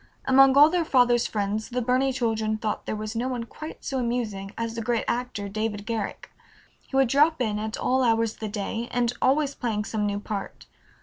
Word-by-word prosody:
Among 270 +1 +6
all 295 +2 +8
their 355 -1 +1
father's 245 -5 +3
friends 210 +1 -2
the 250 0 -2
Burney 255 +2 +2
children 220 -3 -1
thought 215 -1 -3
there - - -2
was 215 +1 -5
no 240 +3 -1
one 250 -2 -3
quite 310 +7 -10
so 270 -2 -1
amusing 225 -5 -2
as 230 0 -3
the 230 - -4
great 230 0 0
actor 235 -4 -2
David 210 0 -3
Garrick. 225 -3 -4 0.6
He - - -7
would 270 -1 +4
drop 300 +5 +3
in 215 -4 0
at 220 0 -4
all 260 +1 +1
hours 225 -2 +2
of - - -22
the 220 - -3
day, 220 +3 -3
and 245 -1 0
always 285 +1 +2
playing 215 -5 -2
some 215 -2 -1
new 205 0 -2
part. 205 -1 -6
230 Hz, 205 wpm, -26 LUFS, 215-255 Hz, 0.6 s, all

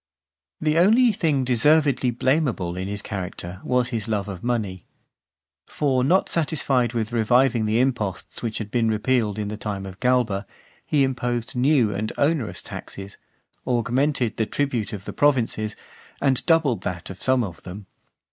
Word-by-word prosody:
XVI. 70 - -17
The 155 +1 +2
only 225 +7 +5
thing 150 -8 +1
deservedly 135 +1 +3
blameable 120 - 0
in 95 +1 -4
his 100 0 -4
character 90 -2 -6
was 125 -1 +1
his 115 -4 -3
love 105 -3 -1
of 95 -3 -7
money. 110 -7 -2 0.8
For 135 -4 0
not 180 +8 +3
satisfied 135 -6 +1
with 115 -2 -2
reviving 120 0 +3
the 110 +2 +2
imposts 120 -7 -2
which 115 -2 -3
had 105 -2 -5
been 115 -2 +2
repealed 110 -1 +1
in 105 -1 -3
the 105 - -5
time 100 -2 -4
of 95 0 -9
Galba, 120 -6 +1 0.4
he 145 -2 +3
imposed 120 -3 -2
new 125 -4 +3
and 110 +2 -3
onerous 145 -6 0
taxes, 100 0 -8 0.5
augmented 125 +1 0
the 110 - 0
tribute 130 -7 -1
of 100 -2 -7
the - - -6
provinces, 115 -6 +1 0.4
and 135 -3 +1
doubled 155 - +3
that 90 -1 -5
of 95 - -11
some 130 -1 +2
of 90 -6 -7
them. 95 +3 -9
120 Hz, 160 wpm, -23 LUFS, 105-135 Hz, 0.8 s, only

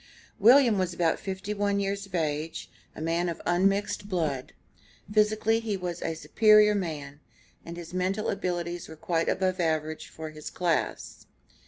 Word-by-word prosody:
William 235 -1 +6
was 180 -2 -1
about 170 -2 +1
fifty 195 +2 -4
one 200 -1 0
years 200 0 -2
of 190 - -7
age, 155 -1 -2 0.2
a - - -8
man 170 +2 0
of 170 - -5
unmixed 195 +3 +1
blood. 155 -8 -2 0.6
Physically 215 +1 +3
he 220 -3 -2
was 180 -2 -5
a 165 - -2
superior 215 +4 +5
man, 150 -7 -4 0.4
and 170 0 -8
his 170 0 -9
mental 185 +3 0
abilities 175 -3 -3
were 160 - -9
quite 165 +1 -1
above 185 -1 0
the 175 - 0
average 155 -1 -2
of 155 -1 -6
his 155 -1 -7
class. 175 -3 -2
180 Hz, 160 wpm, -28 LUFS, 165-200 Hz, 0.6 s, William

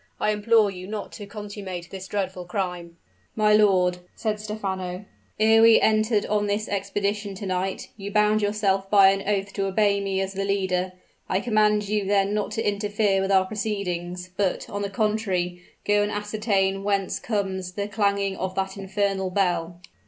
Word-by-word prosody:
I 215 - +2
implore 210 0 +3
you 185 -1 -8
not 210 0 -5
to 205 -2 -9
consummate 200 -4 -7
this 190 -1 -7
dreadful 185 -3 -3
crime!" 175 -2 -4 0.4
"My 210 -1 +4
lord," 185 -4 +4 0.2
said 215 -2 -2
Stephano, 195 -3 -4 0.3
"ere 220 +1 +5
we 225 0 +7
entered 215 -1 +2
on 210 0 0
this 205 +1 -1
expedition 200 +1 -2
to 200 - -7
night, 185 0 -2
you 200 -1 -6
bound 210 +1 +3
yourself 200 -2 0
by 195 -2 +7
an 195 0 -1
oath 200 -1 -1
to 195 0 -1
obey 200 0 +2
me 195 -1 -1
as 195 0 -2
the 195 0 -2
leader. 190 -2 0 0.4
I 185 - +2
command 210 -2 +2
you 210 -1 0
then 200 0 +2
not 210 -1 -1
to 225 - -1
interfere 205 -1 +1
with 195 +1 -1
our 190 -1 +5
proceedings; 185 -4 -4
but, 195 -2 -1
on 205 - -3
the 200 - -2
contrary, 195 -4 -1 0.2
go 205 0 +3
and 205 0 0
ascertain 205 -2 0
whence 200 -1 0
comes 190 -4 -2
the 200 +1 -3
clanging 200 -2 0
of 185 0 -3
that 190 0 -2
infernal 195 -1 -1
bell." 175 -2 -1
200 Hz, 175 wpm, -25 LUFS, 190-210 Hz, 0.4 s, we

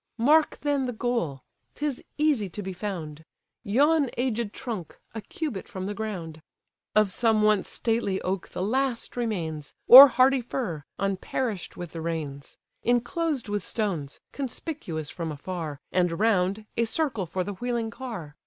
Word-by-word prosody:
Mark 300 +7 +4
then 285 -3 0
the 245 - -3
goal, 220 - -2 0.3
'tis 290 -3 -3
easy 290 -10 +2
to 205 +4 -6
be 190 0 -4
found; 170 -6 -5 0.4
Yon 285 +6 +3
aged 235 -3 -1
trunk, 215 - -6 0.2
a 225 - -5
cubit 265 - -5
from 190 -5 -6
the 205 - -3
ground; 180 -7 -5 0.5
Of 215 -2 +4
some 220 0 +2
once 210 -2 +3
stately 225 -4 0
oak 185 0 -2
the 180 - -4
last 255 +3 -1
remains, 170 -11 -3
Or 270 +3 +13
hardy 260 +1 +4
fir, 200 - -4
unperish'd 195 +2 -2
with 175 -2 -7
the 165 - -6
rains: 150 -4 -5 0.2
Inclosed 245 +3 0
with 205 0 -1
stones, 180 -11 -3
conspicuous 245 - -5
from 165 -2 -4
afar; 155 -1 -5
And 180 -1 +2
round, 205 -1 +2
a 230 - +2
circle 230 - -1
for 185 +3 -2
the 205 - -4
wheeling 235 +1 -2
car. 220 - -7
215 Hz, 150 wpm, -26 LUFS, 175-245 Hz, 0.5 s, Or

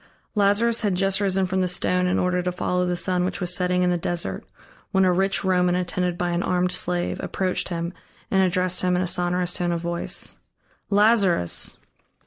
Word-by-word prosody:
Lazarus 210 +3 +2
had 205 -4 0
just 195 +2 +1
risen 195 -1 +1
from 190 +1 -1
the 185 - +1
stone 180 0 0
in 180 - +1
order 180 0 +1
to 180 0 -2
follow 180 0 -1
the 180 - 0
sun 180 0 0
which 185 - -3
was 180 -2 0
setting 180 -1 +1
in 180 - +2
the 175 - 0
desert, 175 0 -3 0.5
when 190 -1 +3
a 180 - +3
rich 195 +3 +1
Roman 180 -1 +2
attended 180 0 -1
by 175 0 -1
an 170 0 0
armed 180 0 0
slave, 175 -1 -1
approached 185 -1 -2
him 170 0 -3 0.4
and 190 - +3
addressed 185 0 +1
him 180 0 +1
in 180 - +1
a - - -2
sonorous 180 0 0
tone 175 -1 -1
of 170 -1 -2
voice: 170 0 -2 0.5
"Lazarus!" 200 - +2
180 Hz, 195 wpm, -23 LUFS, 180-190 Hz, 0.5 s, when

